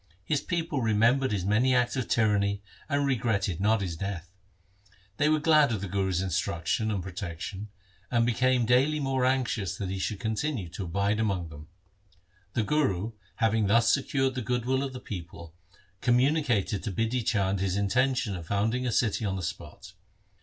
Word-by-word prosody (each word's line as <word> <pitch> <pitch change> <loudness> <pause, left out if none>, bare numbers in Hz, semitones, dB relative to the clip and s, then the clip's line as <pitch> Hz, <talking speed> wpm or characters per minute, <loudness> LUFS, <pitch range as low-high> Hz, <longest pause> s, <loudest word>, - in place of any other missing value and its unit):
His 150 - 0
people 165 -5 -2
remembered 115 +4 +3
his 95 -4 -1
many 120 +6 +3
acts 125 +1 +2
of 130 -3 -2
tyranny 100 -3 +1 0.3
and 145 -1 +1
regretted 110 -9 0
not 110 +1 +3
his 90 -4 -3
death. 90 -1 -5 0.8
They 150 - +3
were 155 - +4
glad 150 -3 +4
of 110 - -1
the 100 - -4
Guru's 95 -1 0
instruction 85 +4 -1
and 100 -4 -2
pro 95 - -7
tection, 95 +2 -6 0.4
and 120 -1 +2
became 125 +1 +2
daily 135 +6 +3
more 135 -2 0
anxious 125 -8 0
that 95 -2 -3
he 95 - -3
should 100 +1 -2
continue 110 - -2
to 95 +3 -6
abide 100 +5 0
among 95 -6 -1
them. 75 0 -11 0.9
The 115 - +1
Guru, 110 -7 0 0.2
having 110 -1 +2
thus 115 +2 +4
secured 135 -1 0
the 130 - -3
goodwill 125 +3 0
of 135 -1 -3
the 125 - -6
people, 85 -5 -8 0.5
communicated 120 - +2
to 105 - -3
Bidhi 115 +5 -1
Chand 100 -3 +1
his 95 0 0
inten 125 +7 +2
tion 110 -7 -1
of 85 -2 -8
founding 115 +7 0
a - - 0
city 110 0 +1
on 100 -2 -1
the 95 - -4
spot. 85 +3 -7
110 Hz, 175 wpm, -28 LUFS, 95-130 Hz, 0.9 s, were